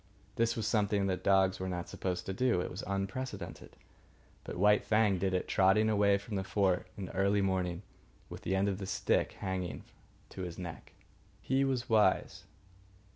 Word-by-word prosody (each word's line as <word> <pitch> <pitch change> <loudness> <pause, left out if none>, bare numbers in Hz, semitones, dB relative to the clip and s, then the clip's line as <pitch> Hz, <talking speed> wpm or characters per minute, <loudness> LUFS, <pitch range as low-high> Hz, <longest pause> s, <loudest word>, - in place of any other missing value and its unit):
This 115 0 +1
was 110 - -2
something 105 -2 +1
that 95 -1 -2
dogs 95 -1 +3
were 95 0 -3
not 90 -1 -4
supposed 90 -1 -3
to 95 - -3
do. 120 -1 +2
It 90 - -3
was - - -6
unprecedented. 100 +1 -4 0.7
But - - -6
White 105 +3 +4
Fang 105 -3 +2
did 95 +1 0
it, 90 - -1
trotting 100 +3 +3
away 100 -1 +4
from 100 +1 -5
the 95 - -1
fort 95 -2 +1
in 100 - -4
the - - -9
early 100 +1 +2
morning, 90 -1 -1 0.4
with - - -9
the 95 - -1
end 95 +1 +2
of 100 -1 -1
the 95 - -5
stick - - 0
hanging 95 -2 -4 0.5
to 95 - -8
his 90 -2 -5
neck. 85 -3 -8 0.5
He 135 +1 +1
was 130 -2 -1
wise. 110 -2 +2
95 Hz, 180 wpm, -32 LUFS, 95-105 Hz, 0.7 s, White